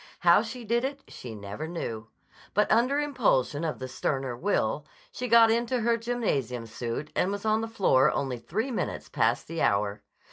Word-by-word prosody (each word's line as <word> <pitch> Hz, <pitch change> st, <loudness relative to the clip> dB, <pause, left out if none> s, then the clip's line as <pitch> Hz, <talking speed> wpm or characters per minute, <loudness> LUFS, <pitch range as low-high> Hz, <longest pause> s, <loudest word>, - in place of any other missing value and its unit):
How 175 Hz, +3 st, +6 dB
she 235 Hz, +2 st, -7 dB
did 235 Hz, +2 st, +1 dB
it 275 Hz, +1 st, -3 dB
she 115 Hz, -3 st, -9 dB
never 105 Hz, +9 st, -6 dB
knew. 115 Hz, -10 st, -5 dB, 0.5 s
But 210 Hz, +1 st, +3 dB
under 245 Hz, +6 st, +3 dB
impulsion 215 Hz, -, +1 dB
of 160 Hz, -2 st, -2 dB
the 130 Hz, -, -5 dB
sterner 130 Hz, -1 st, -2 dB
will, 150 Hz, -, 0 dB, 0.3 s
she 250 Hz, -, -4 dB
got 230 Hz, -1 st, +7 dB
into 235 Hz, +2 st, 0 dB
her 235 Hz, +1 st, +3 dB
gymnasium 210 Hz, -, -2 dB
suit 115 Hz, +5 st, -5 dB
and 185 Hz, -, +1 dB
was 205 Hz, +1 st, -4 dB
on 215 Hz, 0 st, +2 dB
the 225 Hz, -, -3 dB
floor 150 Hz, -11 st, +3 dB
only 130 Hz, -3 st, -2 dB
three 220 Hz, -, -3 dB
minutes 230 Hz, -, -3 dB
past 115 Hz, +1 st, +1 dB
the 165 Hz, 0 st, -4 dB
hour. 100 Hz, 0 st, +1 dB
175 Hz, 180 wpm, -28 LUFS, -, 0.5 s, got